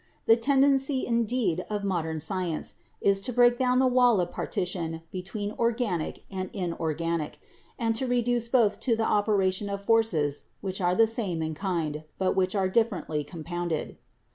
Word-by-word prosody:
The 225 - +7
tendency, 270 +2 +2
indeed, 230 -6 0
of 210 -1 -2
modern 165 -5 -1
science 170 0 -3 0.2
is 195 0 +3
to 250 - -1
break 240 0 +4
down 250 -1 +2
the 260 - +4
wall 245 -4 +4
of 175 -1 -1
partition 165 -3 -3
between 205 +3 -4
organic 230 -8 -1
and 185 -1 -4
inorganic, 165 -3 -2 0.4
and 225 -1 +1
to 260 - -1
reduce 245 -1 +1
both 230 -4 +3
to 235 -3 +1
the 225 0 0
operation 205 -2 +1
of 200 0 -5
forces 175 -11 +2
which 190 0 -4
are 180 0 +2
the 225 - +6
same 210 -8 -2
in 160 0 -3
kind, 155 -4 -2
but 190 -1 +1
which 185 +1 +1
are 190 -2 +2
differently 185 -8 0
compounded. 170 0 -4
195 Hz, 160 wpm, -27 LUFS, 175-235 Hz, 0.4 s, The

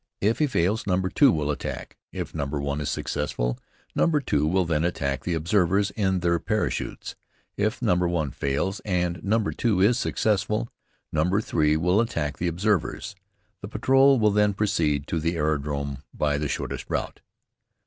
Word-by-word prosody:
If 110 +3 +1
he 150 - +3
fails, 100 -2 0
number 95 -1 +1
2 140 -4 +5
will 75 -4 0
attack. 70 - -5 0.2
If - - -5
number 70 -2 -2
1 70 +1 -2
is 75 - -2
successful, - - -2 0.3
number 160 -3 +2
2 75 - 0
will 90 +2 +2
then 80 -2 0
attack 70 -6 -1
the 85 - -1
observers 95 +4 +2
in 95 -4 0
their 85 -1 +2
parachutes. 110 +4 -2 0.4
If - - -1
number 90 0 +2
1 80 -5 -1
fails, 70 - -1
and 90 -4 -1
number 105 +1 +1
2 110 -6 0
is 115 +5 +4
successful, 105 +1 0 0.4
number 90 +6 +2
3 75 -7 +1
will 90 +6 +3
attack 80 -11 -2
the 90 - 0
observers. 100 +3 -1 0.5
The 100 - -6
patrol 135 +5 +4
will 105 -1 +4
then 105 -1 +2
proceed 80 -9 +1
to 85 - -2
the 85 +2 -1
aerodrome 70 -3 -1 0.2
by 75 -1 0
the 75 - -1
shortest - - -4
route. - - -3
90 Hz, 165 wpm, -25 LUFS, 75-105 Hz, 0.5 s, 2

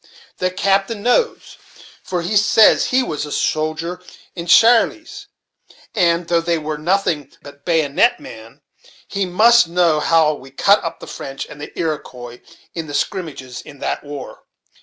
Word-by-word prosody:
The 185 - 0
captain 195 +3 0
knows, 245 - 0 0.4
for 180 -2 -3
he 205 +5 -2
says 210 +1 +5
he 255 +1 +1
was 150 - -4
a 150 - -7
soldier 160 +5 -2 0.3
in 170 -1 -6
Shirley's; 280 - +3 0.7
and, 170 -1 +1
though 170 -1 +2
they 170 0 0
were 155 -1 -5
nothing 170 -3 -1
but 140 0 -14
baggonet 165 - +2
men, 115 +5 -12 0.5
he 195 -2 -2
must 225 +3 +5
know 170 -2 +2
how 155 0 +3
we 135 -2 -11
cut 200 +9 +3
up 165 - -5
the - - -8
French 135 0 -7
and 150 - -12
Iroquois 125 -7 -5 0.3
in 165 -2 -5
the 145 - -6
skrimmages 145 - -4
in 145 - -14
that - - -3
war. 145 -2 -9
170 Hz, 150 wpm, -19 LUFS, 150-195 Hz, 0.7 s, says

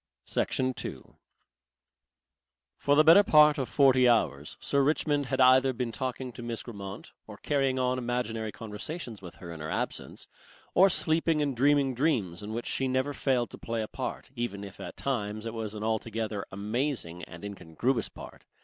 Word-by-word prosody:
Section 130 0 0
2 - - -7 1.6
For 145 - +2
the 155 - +6
better 165 +5 +8
part 150 -6 +6
of 130 - -2
forty 130 -3 +5
hours, 75 -11 +1
Sir 140 - +1
Richmond 145 0 +1
had 130 +1 -2
either 130 +1 +6
been 120 -1 -3
talking 130 +2 -4
to 120 - -10
Miss 115 -1 -4
Grammont, 100 -4 -8 0.2
or - - -10
carrying 135 -3 0
on 130 0 +1
imaginary 120 -3 -2
conversations 115 - -6
with 90 -3 -10
her 85 -2 -9
in 80 - -9
her 80 +1 -5
absence, - - -4 0.5
or 190 +2 +6
sleeping 160 -2 +2
and 145 -3 0
dreaming 140 +1 +3
dreams 120 - 0
in 105 +1 -6
which 115 +2 -4
she 135 - 0
never 130 +2 0
failed 130 -3 0
to - - -10
play 115 -1 -2
a - - -5
part, 130 +1 -6
even 120 -5 -3
if 100 -2 -10
at - - -8
times 110 -5 -2
it 115 - -4
was 110 -2 -4
an 105 - -5
altogether 110 -1 -2
amazing 105 - -2
and 85 +4 -10
incongruous 100 - -2
part. - - -12
120 Hz, 175 wpm, -29 LUFS, 105-135 Hz, 1.6 s, better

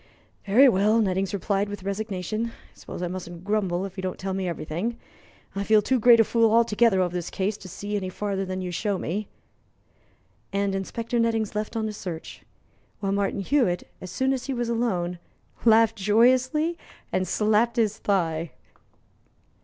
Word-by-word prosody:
"Very 245 +8 +7
well," 210 0 +4
Nettings 195 -2 0
replied, 200 +1 -1
with 205 -2 -7
resignation. 200 +1 -3
"I - - -8 0.2
suppose - - -8
I - - 0
mustn't 175 -1 -7
grumble 195 -3 0
if 195 0 -9
you - - -3
don't 185 -1 -3
tell 190 0 -3
me 190 -1 -2
everything. 175 +7 -3 0.6
I 200 - -1
feel 215 +1 +5
too 260 +4 +2
great 235 +1 +7
a - - +8
fool 230 0 +3
altogether 230 -2 +4
over 180 -1 0
this 175 -1 -3
case 195 +2 -1
to 190 - -11
see 205 +3 -5
any 190 -2 -2
farther 195 0 -2
than 185 0 -4
you 180 - -4
show 200 +3 -1
me." 200 +4 -3 1.2
And 200 0 0
Inspector 230 +5 -2
Nettings 225 -2 +1
left 210 +1 -3
on 220 -1 -1
his 215 -1 -4
search; 170 -3 -7 0.6
while 195 -1 -1
Martin 200 0 0
Hewitt, 195 -6 +1
as 185 - -7
soon 265 +8 0
as 260 0 -4
he 270 - -2
was 240 -1 -2
alone, 180 -7 -1 0.5
laughed 225 0 +5
joyously 255 - +3 0.3
and 185 - 0
slapped 215 +4 +2
his 220 -2 +1
thigh. 165 -5 0
205 Hz, 175 wpm, -25 LUFS, 185-230 Hz, 1.2 s, a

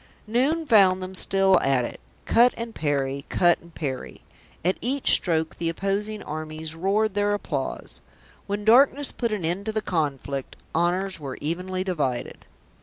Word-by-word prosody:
Noon 270 +9 +1
found 190 -7 +5
them 185 +1 -6
still 190 0 +3
at 135 -3 +2
it; - - -7 0.3
cut 240 +2 +4
and 230 -1 -5
parry, 140 -4 -1
cut 175 -1 +3
and 170 - -17
parry; 135 -4 -5 0.4
at 185 - +1
each 270 +3 +1
stroke 160 -2 +2
the 165 - -1
opposing 200 +5 -2
armies 155 +1 -6
roared 195 +5 +1
their 205 0 +1
applause. 145 -9 -4 0.5
When 205 +1 -3
darkness 270 +5 +5
put 235 -2 -2
an 205 -6 -2
end 185 +6 -2
to - - 0
the 215 - -1
conflict, 140 -6 -2 0.2
honours 180 +3 0
were 135 -3 -6
evenly 180 +4 -2
divided. 145 -10 -3
185 Hz, 155 wpm, -25 LUFS, 155-210 Hz, 0.5 s, found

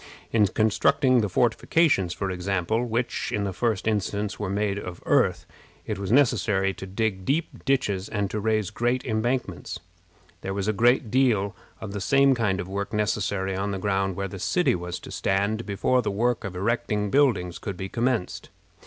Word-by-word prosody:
In 105 -3 +4
constructing 125 +5 +3
the 105 - -1
fortifications, 120 - +2
for 95 +1 -3
example, 95 +4 -1
which, 120 +1 -2
in 105 - -1
the 100 -2 -2
first 110 -1 -1
instance, 105 -1 -1
were 105 -2 -2
made 100 0 -1
of 90 -3 -7
earth, - - +2 0.4
it - - -3
was 100 0 -3
necessary 105 -7 +3
to 95 - -8
dig 95 -1 -2
deep 155 - -2
ditches 105 -8 0
and 105 -2 -1
to 105 - -2
raise 110 -2 0
great 120 +3 0
embankments. 120 +3 -2 0.6
There 95 0 -4
was 100 0 -2
a 110 - +2
great 120 +1 +3
deal 110 -6 +2 0.2
of 110 - -6
the 100 0 -4
same 135 +5 +4
kind 105 -6 0
of 90 - -4
work 100 +2 -4
necessary 100 -2 0
on 100 +2 -2
the 100 - -2
ground 95 -1 0
where 100 +1 -2
the 95 +1 -8
city 180 - +2
was 90 0 -4
to - - -10
stand 100 +4 0
before 105 +6 +1
the 110 - -2
work 115 +4 0
of 100 -3 -5
erecting 105 0 -1
buildings 110 -12 +2
could 100 -3 -5
be 95 - -4
commenced. 120 -2 -2
105 Hz, 180 wpm, -25 LUFS, 95-120 Hz, 0.6 s, In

